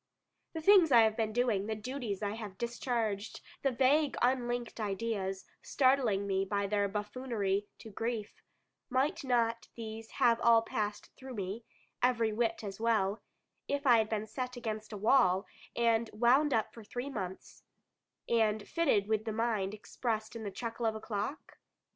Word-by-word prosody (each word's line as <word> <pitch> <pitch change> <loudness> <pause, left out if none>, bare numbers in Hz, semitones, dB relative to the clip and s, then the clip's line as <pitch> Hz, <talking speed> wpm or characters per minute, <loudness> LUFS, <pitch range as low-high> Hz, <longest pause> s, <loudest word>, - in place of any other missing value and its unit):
The 320 - -4
things 365 -3 +6
I 235 -2 +8
have 220 -1 +3
been 220 -1 0
doing, 220 -4 +1
the 220 - -1
duties 215 -3 -4
I 205 - 0
have 210 -3 -7
discharged, 235 -3 -2 0.2
the 275 - +2
vague 270 +2 +2
unlinked 240 -2 0
ideas, 195 -2 -2 0.2
startling 255 -7 +2
me 195 -1 +1
by 200 +1 -1
their 200 0 +1
buffoonery 210 -1 -2
to 220 - -11
grief 225 0 -4 0.5
might 285 +5 0
not 235 -3 +1
these 225 -1 -7
have 230 -1 +3
all 230 -1 +6
passed 210 -2 -3
through 260 -1 -9
me, 200 +3 -4 0.4
every 235 -3 +2
whit 230 0 0
as 195 -1 -6
well, 220 -3 +1 0.5
if 285 0 -2
I 240 -3 +7
had 215 -1 0
been 215 -1 -1
set 250 +3 -5
against 215 -2 -4
a 210 - -5
wall, 195 -3 +4 0.3
and 230 -1 +2
wound 250 +7 +4
up 220 -4 0
for 230 - -11
three 245 +6 -5
months, 190 -6 -6 0.7
and 220 -2 +1
fitted 275 -12 +2
with 220 0 0
the 220 - -2
mind 215 -3 -1
expressed 220 +1 -3
in 230 - -5
the 210 - -4
chuckle 230 +3 -3
of 220 - 0
a - - -4
clock? 215 +6 -5
225 Hz, 165 wpm, -32 LUFS, 210-245 Hz, 0.7 s, I